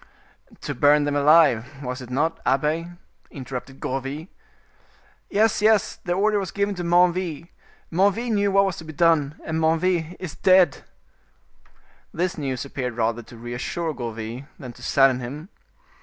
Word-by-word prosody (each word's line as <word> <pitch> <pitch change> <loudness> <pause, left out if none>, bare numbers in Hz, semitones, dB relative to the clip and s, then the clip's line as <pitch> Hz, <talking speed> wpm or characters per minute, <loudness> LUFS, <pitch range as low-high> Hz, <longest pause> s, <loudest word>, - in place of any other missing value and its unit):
"To - - -4
burn 145 +1 +4
them 145 0 -1
alive, 145 -3 +3
was 125 +1 -4
it 125 - -10
not, 160 +6 0
abbe?" 150 +5 0 0.4
interrupted 135 0 -8
Gourville. 135 +6 -4 1.0
"Yes, 215 0 +2
yes, 215 -1 +3
the 175 - -3
order 205 +3 +2
was 190 -3 -4
given 200 +1 -1
to 175 -2 -5
Menneville. 175 -1 +1 0.4
Menneville 200 +7 +1
knew 200 -1 +2
what 195 0 +4
was 190 -3 -2
to - - -8
be 155 0 -9
done, 155 -2 +2
and 160 0 -2
Menneville 165 +1 +1
is 175 -5 -6
dead." 185 -5 +3 1.3
This 180 +2 -2
news 135 -4 -3
appeared 125 -3 -5
rather 115 0 0
to 115 +1 -14
reassure 125 +8 -4
Gourville 115 +1 -6
than 125 -5 -9
to - - -17
sadden 135 -2 +3
him. 145 +8 -7
155 Hz, 150 wpm, -23 LUFS, 130-180 Hz, 1.3 s, burn